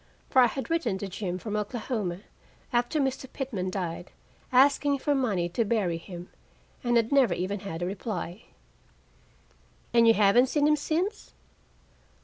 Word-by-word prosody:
For 260 Hz, -, +6 dB
I 245 Hz, -, +7 dB
had 270 Hz, +7 st, -5 dB
written 255 Hz, -13 st, 0 dB
to 200 Hz, -, -5 dB
Jim 185 Hz, -1 st, -4 dB
from 210 Hz, +3 st, -5 dB
Oklahoma, 210 Hz, -4 st, -3 dB, 0.5 s
after 240 Hz, +5 st, +1 dB
Mr. 265 Hz, -1 st, -2 dB
Pitman 220 Hz, -9 st, -3 dB
died, 175 Hz, -2 st, -4 dB, 0.4 s
asking 280 Hz, +2 st, +4 dB
for 290 Hz, +2 st, 0 dB
money 215 Hz, -11 st, 0 dB
to 230 Hz, +7 st, 0 dB
bury 200 Hz, -6 st, 0 dB
him, 175 Hz, +1 st, -9 dB, 0.6 s
and 240 Hz, -1 st, +3 dB
had 230 Hz, -1 st, +1 dB
never 260 Hz, -10 st, +4 dB
even 195 Hz, +3 st, -2 dB
had 175 Hz, -3 st, -5 dB
a -, -, 0 dB
reply. 185 Hz, 0 st, -5 dB, 1.5 s
"And 235 Hz, -1 st, +6 dB
you 225 Hz, -, +6 dB
haven't 210 Hz, +5 st, +5 dB
seen 295 Hz, 0 st, +2 dB
him 300 Hz, -, +5 dB
since?" 345 Hz, +8 st, -2 dB
225 Hz, 150 wpm, -27 LUFS, 185-265 Hz, 1.5 s, I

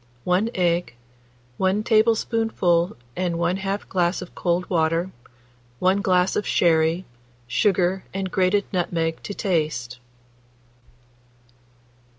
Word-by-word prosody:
1 185 Hz, +5 st, +1 dB
egg, 175 Hz, -6 st, 0 dB, 0.6 s
1 190 Hz, +3 st, +1 dB
tablespoonful 220 Hz, -, +2 dB, 0.2 s
and 180 Hz, -2 st, -1 dB
1/2 190 Hz, +4 st, -1 dB
glass 175 Hz, -1 st, 0 dB
of 180 Hz, -, -9 dB
cold 175 Hz, 0 st, -1 dB
water, 165 Hz, +1 st, 0 dB, 0.7 s
1 190 Hz, +5 st, +2 dB
glass 180 Hz, -1 st, +2 dB
of 210 Hz, -, -1 dB
sherry, 165 Hz, +1 st, +2 dB, 0.4 s
sugar 185 Hz, -, +1 dB
and 190 Hz, -1 st, -4 dB
grated 190 Hz, +2 st, +2 dB
nutmeg 165 Hz, -2 st, -1 dB
to 200 Hz, -, -6 dB
taste. 150 Hz, -, -1 dB
180 Hz, 100 wpm, -23 LUFS, 170-195 Hz, 0.7 s, tablespoonful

